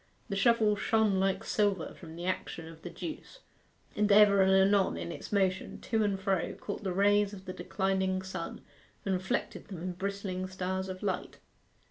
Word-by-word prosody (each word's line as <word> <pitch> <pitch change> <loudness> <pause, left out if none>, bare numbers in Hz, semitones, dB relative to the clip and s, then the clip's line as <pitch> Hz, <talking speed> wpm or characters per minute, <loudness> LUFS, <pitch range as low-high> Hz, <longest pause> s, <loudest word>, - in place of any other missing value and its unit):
The 200 - -1
shovel 215 0 +4
shone 210 -1 +2
like 195 +2 +1
silver 200 -7 0
from 165 -2 -11
the 170 +1 -6
action 175 -3 -3
of 165 0 -12
the 175 - -6
juice, 310 - -7 0.6
and 210 0 +2
ever 200 -1 +7
and 190 0 +5
anon, 190 - +4
in 85 0 -4
its - - -8
motion 190 -2 0
to 220 -2 +1
and 200 -2 0
fro, 195 -1 0
caught 205 +1 -6
the 190 - -1
rays 205 +2 +3
of 190 -2 -10
the 185 - -5
declining 190 -1 -1
sun 190 - -5 0.4
and 195 - +1
reflected 185 0 -2
them 190 -5 -7
in 185 - -2
bristling 190 0 -3
stars 190 0 -3
of 185 +2 -6
light. 190 -3 -2
190 Hz, 180 wpm, -31 LUFS, 185-205 Hz, 0.6 s, ever